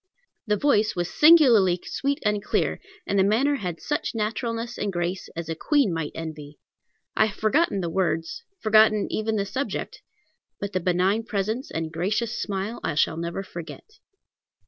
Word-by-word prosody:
The 210 0 +2
voice 215 -5 +2
was 175 -1 -3
singularly 245 - +6
sweet 280 0 -1
and 210 -1 +1
clear, - - 0 0.3
and 200 - 0
the - - +5
manner 255 +9 +2
had 180 -7 -5
such 295 -5 -3
naturalness 230 +2 -3
and 205 - -1
grace 175 +1 -3
as 170 -1 -5
a 165 - -2
queen 275 - +1
might 160 -2 -3
envy. 150 -2 -7 0.6
I 215 - +4
have 210 - -8
forgotten 220 - +1
the 170 - -2
words, 165 - -1 0.2
forgotten 215 -1 +5
even 220 0 -1
the 200 -2 0
subject, 265 +7 -4 0.6
but 200 0 -5
the 185 - +1
benign 185 +4 +1
presence 220 +5 -2
and 160 -1 -4
gracious 210 +7 -1
smile 200 +3 -3
I - - -1
shall 155 - +2
never 170 +3 -4
forget. 170 - -10
205 Hz, 165 wpm, -25 LUFS, 175-230 Hz, 0.6 s, singularly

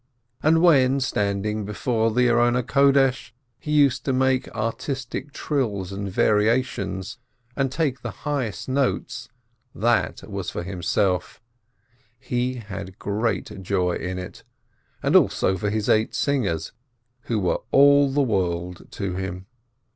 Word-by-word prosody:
And 160 +2 +3
when, 135 -5 +5
standing 105 -3 -1
before 110 +2 0
the 125 +3 +2
altar, 125 +3 +3 0.5
he 150 - -6
used 140 -3 +3
to 135 - +1
make 130 0 +1
artistic 125 +4 -4
trills 105 - -2
and 100 0 -4
variations, 105 -1 0 0.4
and 135 -2 0
take 140 -3 -1
the - - -4 0.2
highest 130 - -2
notes, 130 -3 -1 0.5
that 120 +3 0
was 100 -4 -4
for - - -5
himself 90 0 -1 0.4
— 120 +1 -39
he 125 +1 0
had 100 -4 -8
great 105 -1 -2
joy 90 -1 0
in 90 +1 -4
it 90 0 -8 0.3
— - - -37
and - - +2
also 95 - +4
for 100 +3 -2
his 110 0 -2
eight 110 0 +2
singers, 110 - -1 0.5
who 115 - -1
were 90 -3 0
all 140 0 +6
the 140 +1 +2
world 90 -6 -2
to 95 -3 -3
him. 95 -1 -5
115 Hz, 130 wpm, -23 LUFS, 100-130 Hz, 0.5 s, all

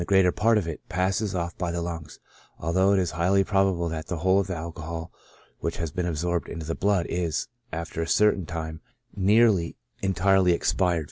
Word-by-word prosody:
IJ 85 - -4
greater 95 -2 +5
part 110 +3 +3
of 95 -6 -1
it, 80 - -5
passes 95 +3 0
ofF 85 0 -2
by 90 -1 -1
the 85 - -2
lungs; 85 -3 -6 0.4
although 95 +5 +2
it - - +3
is 90 -3 +1
highly 90 +4 +2
probable 95 -3 +1
that 80 -1 -4
the 85 - -3
whole 95 +4 +3
of 100 - -1
the 95 - -3
alcohol 80 0 -6 0.5
which 85 - -3
has 85 -3 -3
been 90 +3 -2
absorbed 85 +1 -1
into 80 -2 -6
the 80 - -2
blood, 100 -2 +1
is, 85 -3 -1 0.2
after 85 0 -4
a 80 - -2
certain 105 -3 +3
time, 80 0 -5 0.3
near 110 +4 +5
ly* 85 -4 -2 0.3
entirely 95 -1 +3
expired. 90 0 +1
90 Hz, 200 wpm, -26 LUFS, 85-95 Hz, 0.5 s, greater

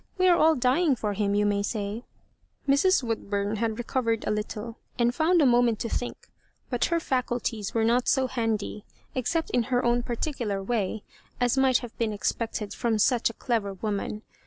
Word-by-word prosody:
We 370 0 +4
are 355 - +6
all 320 -1 +5
dying 270 +4 +3
for 210 -3 -2
him, 200 0 0
you 210 0 +2
may 205 0 +1
say." 205 +2 -3 0.6
Mrs. 280 +4 +4
Woodbum 205 -2 -2
had 220 0 -1
recovered 235 -2 -1
a - - 0
little, 210 +2 -4 0.2
and 240 0 +2
found 330 +3 +3
a - - +5
moment 240 -2 +4
to 230 - -2
think, 245 - -4 0.4
but 245 - +1
her 335 - +1
&culties 245 -8 -2
were 225 - +2
not 240 +2 +2
so 265 -1 +3
handy, 225 -4 -2 0.3
except 320 +6 -1
ui 245 - +4
her 245 +1 0
own 240 0 +3
particular 240 -5 -3
way, 215 -1 -1 0.4
as 245 0 +2
might 265 -2 +4
have 230 - -13
been 225 -2 0
expected 210 0 -2
from 230 -3 0
such 235 +2 +3
a - - -8
clever 215 -6 -1
woman. 210 +1 -3
235 Hz, 185 wpm, -27 LUFS, 210-255 Hz, 0.6 s, are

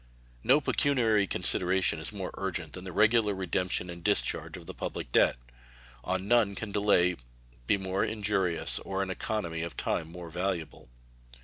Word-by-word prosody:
No 135 +3 +5
pecuniary 120 -9 +2
consideration 90 -2 +3
is 80 - -4
more 100 -3 -5
urgent 90 -5 -4
than 90 0 -7
the 95 - -6
regular 110 +1 +3
redemption 90 -1 -1
and 85 -1 -9
discharge - - +1
of - - -12
the - - -8
public - - -5
debt. - - +4 0.7
On 95 +4 -2
none 110 -4 +3
can 105 +1 -5
delay 90 -4 +3 0.5
be - - +3
more 95 0 -1
injurious 100 -5 0
or 95 0 -3
an 95 - -4
economy 90 -4 -3
of 85 0 -5
time 80 0 -2
more 85 -1 -9
valuable. 85 -6 -3
95 Hz, 155 wpm, -29 LUFS, 90-105 Hz, 0.7 s, No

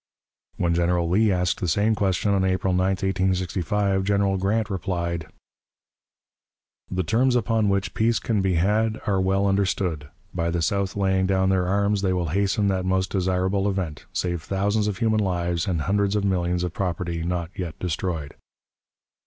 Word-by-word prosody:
When 85 -1 +1
General 85 0 +1
Lee 105 +5 +3
asked 90 -1 0
the 90 - -2
same 100 +7 +2
question, 100 -1 0
on 95 -1 +2
April 95 0 +1
9, 90 +1 +2
1865, 95 0 0
General 100 0 +1
Grant 105 +3 0
replied: 85 -3 -2 1.6
"The 95 0 -1
terms 125 +8 +2
upon 115 -3 +1
which 100 0 0
peace 115 +1 +2
can 110 -4 0
be 95 -2 +1
had 105 +6 +1
are 95 -2 +1
well 95 +1 +1
understood. 95 -6 0 0.2
By 85 -1 -1
the 85 0 -1
South 100 +2 0
laying 95 -1 +1
down 95 0 +2
their 95 -2 +1
arms, 100 +1 +1
they 95 -2 +1
will 90 -3 -1
hasten 100 +3 +1
that 95 -1 0
most 95 0 0
desirable 95 +1 0
event, 90 -6 -4
save 85 -2 -2
thousands 105 +4 0
of 105 - -2
human 110 -2 +1
lives 85 -3 -1
and 85 -5 0
hundreds 100 +4 +1
of 105 - 0
millions 90 -2 0
of 90 -2 -3
property 85 -3 -2
not 85 0 -2
yet 90 -5 -5
destroyed." 85 -4 -3
95 Hz, 165 wpm, -24 LUFS, 90-100 Hz, 1.6 s, Lee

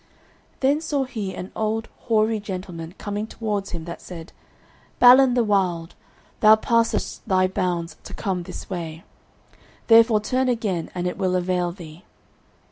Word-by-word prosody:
Then 280 +3 +2
saw 290 -4 -1
he 220 -7 -5
an 185 - -7
old 220 +1 -1 0.2
hoary 220 -1 +2
gentleman 180 -4 -7
coming 210 +1 -4
towards 210 -3 -3
him 165 -2 -6
that 170 - -7
said, 165 -3 -10 0.6
"Balin 250 0 +7
the 245 - +3
Wild, 180 -5 0 0.5
thou 215 0 +8
passest 230 +1 0
thy 185 -2 +3
bounds 175 -2 -2
to - - -8
come 190 -4 -2
this 170 - -8
way; 165 -3 -6 0.8
therefore 225 -1 +6
turn 255 +5 0
again 205 -8 -1
and 180 0 -2
it 180 - -3
will 185 -1 +1
avail 180 -1 0
thee." 170 -1 -12
200 Hz, 145 wpm, -23 LUFS, 180-225 Hz, 0.8 s, thou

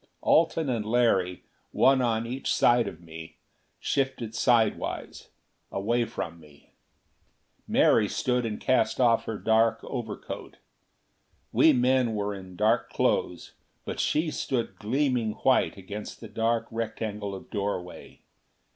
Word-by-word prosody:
Alten 165 -1 +3
and 120 -4 -1
Larry, 105 -6 +1 0.3
one 135 0 +4
on 115 -2 0
each 130 +3 -3
side 120 -1 +4
of 85 - -8
me, 80 -1 -10 0.4
shifted 130 -5 -1
sidewise, 115 -3 0 0.4
away 115 +5 0
from 85 -6 -6
me. 75 -2 -19 1.0
Mary - - +4
stood 125 -1 0
and 110 -2 -3
cast 130 - +1
off 115 -3 +3
her 110 - -4
dark 115 +1 +2
overcoat. 115 -5 -6 0.9
We 160 - +6
men 125 -3 +2
were 105 0 -2
in 95 -2 -10
dark 110 +4 +2
clothes, 90 -1 -1 0.3
but - - -5
she 155 +1 +1
stood 130 -4 -2
in - - -29
gleaming 125 -1 0
white 130 +1 +2
against 100 +2 -8
the 115 - -9
dark 115 +2 0
rectangle 110 -3 -4
of 95 - -12
doorway. 100 -4 -5
115 Hz, 130 wpm, -27 LUFS, 105-125 Hz, 1.0 s, We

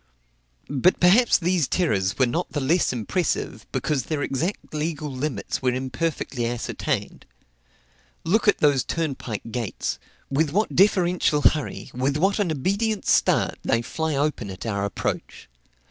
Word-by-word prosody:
But 145 +6 +2
perhaps 210 +7 +5
these 175 -4 +1
terrors 100 - 0
were 130 - +4
not 165 +9 -2
the 145 - 0
less 160 +6 +2
impressive, 130 - -2
because 140 -6 -1
their 150 -3 -2
exact 160 +10 -3
legal 150 -1 -3
limits 130 -5 -3
were 125 -1 +1
imperfectly 130 -2 -2
ascertained. 120 0 -3 1.0
Look 215 +7 +1
at 205 - +5
those 145 -3 +3
turnpike 130 -9 -3
gates; 120 -4 -3 0.3
with 150 +3 +2
what 210 +3 0
deferential 180 -6 +3
hurry, 150 -3 +1
with 135 +3 0
what 195 +6 +2
an 195 -5 +1
obedient 200 - -1
start, - - +2
they 115 +1 +1
fly 160 +4 -2
open 140 -7 -1
at 95 +3 -7
our 100 -3 -1
approach! 100 - -4
150 Hz, 140 wpm, -24 LUFS, 125-175 Hz, 1.0 s, perhaps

